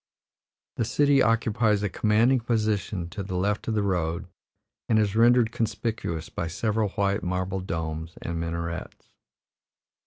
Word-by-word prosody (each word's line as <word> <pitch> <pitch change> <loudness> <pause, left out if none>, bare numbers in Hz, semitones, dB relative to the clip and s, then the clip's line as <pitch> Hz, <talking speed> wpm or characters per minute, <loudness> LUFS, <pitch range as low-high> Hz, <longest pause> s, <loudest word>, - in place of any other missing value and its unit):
The - - +1
city 140 +3 +3
occupies 110 -2 +2
a - - +2
commanding 110 +6 +3
position 105 -6 -1
to 105 - -5
the 95 -1 -5
left 100 +3 -1
of 110 - 0
the 105 - +1
road, 85 -4 -1 0.6
and 110 - +4
is 105 -1 +1
rendered 120 0 +5
conspicuous 110 -8 -2
by 85 - -4
several 105 +5 0
white 100 0 0
marble 90 +1 -2
domes 80 -2 -4
and 85 -1 -4
minarets. 85 0 -5
105 Hz, 135 wpm, -26 LUFS, 85-115 Hz, 0.6 s, rendered